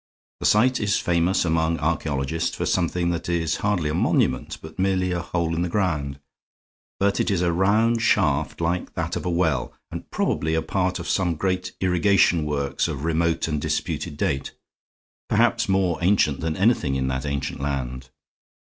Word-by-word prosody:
The -, -, +1 dB
site 125 Hz, +5 st, +4 dB
is 105 Hz, -1 st, +1 dB
famous 90 Hz, +2 st, +1 dB
among 80 Hz, 0 st, +1 dB
archaeologists 80 Hz, 0 st, -1 dB
for -, -, -2 dB
something 85 Hz, 0 st, 0 dB
that 85 Hz, 0 st, -4 dB
is 80 Hz, -2 st, 0 dB
hardly 100 Hz, -7 st, 0 dB
a 75 Hz, -, -1 dB
monument, 65 Hz, -5 st, +1 dB
but 80 Hz, +3 st, -12 dB
merely 95 Hz, -1 st, +1 dB
a 90 Hz, -1 st, -1 dB
hole 85 Hz, -2 st, -2 dB
in 85 Hz, -, -1 dB
the 90 Hz, -, -1 dB
ground. 75 Hz, -8 st, -1 dB, 0.8 s
But 100 Hz, 0 st, +1 dB
it -, -, +1 dB
is 90 Hz, -3 st, +1 dB
a 85 Hz, -, +2 dB
round 110 Hz, +6 st, +2 dB
shaft, 80 Hz, -9 st, +1 dB
like 85 Hz, +2 st, -2 dB
that -, -, -2 dB
of -, -, -3 dB
a -, -, +1 dB
well, 80 Hz, -7 st, 0 dB, 0.2 s
and -, -, -7 dB
probably 80 Hz, +1 st, 0 dB
a 80 Hz, -, 0 dB
part 90 Hz, +2 st, -1 dB
of 85 Hz, -, -6 dB
some 90 Hz, -3 st, +1 dB
great 90 Hz, +2 st, -2 dB
irrigation 90 Hz, -2 st, +3 dB
works 70 Hz, -2 st, -1 dB
of 70 Hz, -, -5 dB
remote 85 Hz, 0 st, +1 dB
and 75 Hz, -2 st, -2 dB
disputed 75 Hz, -1 st, -2 dB
date, 70 Hz, -1 st, -1 dB, 0.8 s
perhaps -, -, +2 dB
more 95 Hz, -3 st, +1 dB
ancient 85 Hz, -6 st, +2 dB
than 80 Hz, -1 st, -2 dB
anything 95 Hz, -, +2 dB
in 65 Hz, -1 st, -1 dB
that 65 Hz, +2 st, -3 dB
ancient 70 Hz, -1 st, -3 dB
land. 65 Hz, -2 st, -4 dB
85 Hz, 175 wpm, -24 LUFS, 75-90 Hz, 0.8 s, site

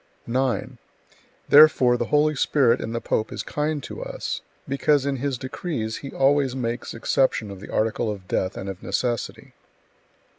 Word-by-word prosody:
9. 130 Hz, 0 st, -1 dB, 0.7 s
Therefore 145 Hz, -5 st, +7 dB
the 120 Hz, 0 st, -1 dB
Holy 150 Hz, +4 st, +3 dB
Spirit 135 Hz, -3 st, +3 dB
in 115 Hz, -, -4 dB
the 115 Hz, -, -2 dB
pope 110 Hz, -1 st, -1 dB
is -, -, -4 dB
kind 150 Hz, 0 st, -2 dB
to -, -, -7 dB
us, -, -, -4 dB, 0.3 s
because 140 Hz, +1 st, +2 dB
in 140 Hz, -1 st, -1 dB
his 135 Hz, 0 st, -2 dB
decrees 130 Hz, -4 st, -4 dB
he 140 Hz, -, -7 dB
always 135 Hz, -1 st, +2 dB
makes 120 Hz, -1 st, -3 dB
exception 115 Hz, -2 st, +1 dB
of 100 Hz, -, -9 dB
the -, -, -11 dB
article 110 Hz, +1 st, 0 dB
of 100 Hz, -3 st, -6 dB
death 95 Hz, 0 st, -1 dB
and 95 Hz, -, -6 dB
of 95 Hz, -1 st, -6 dB
necessity. 120 Hz, -2 st, -3 dB
130 Hz, 160 wpm, -24 LUFS, 115-145 Hz, 0.7 s, Therefore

